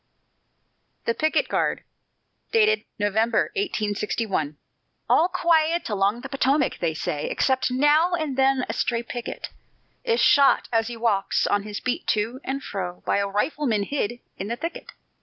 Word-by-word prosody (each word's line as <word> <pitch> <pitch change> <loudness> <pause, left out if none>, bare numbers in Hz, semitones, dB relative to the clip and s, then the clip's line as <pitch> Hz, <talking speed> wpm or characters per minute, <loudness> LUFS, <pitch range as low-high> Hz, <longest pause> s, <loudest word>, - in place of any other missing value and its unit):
THE 230 - +1
PICKET 310 +5 +1
GUARD - - 0 1.1
[November, 215 +3 +1
1861] 210 - -2 0.5
"All 335 - +4
quiet 340 -3 +2
along 205 +3 +1
the 270 - -6
Potomac," 275 0 +1
they 165 -2 -1
say, 150 -1 -3
"Except 260 -1 +1
now 295 +7 +3
and 310 -5 -3
then 265 -1 +2
a 225 - -3
stray 235 -1 -1
picket 240 0 -6 0.5
Is 470 -1 +1
shot, 280 -1 +5
as 225 -1 +2
he 240 -1 -6
walks 220 -4 +1
on 205 - +2
his 210 0 -6
beat 255 - -3
to 230 +6 -2
and 275 +1 -3
fro, 180 -3 -5
By - - +1
a 200 - 0
rifleman 225 +1 0
hid 240 -1 -3 0.2
in 195 - -4
the 235 - -2
thicket. 335 +7 -6
240 Hz, 145 wpm, -24 LUFS, 205-290 Hz, 1.1 s, shot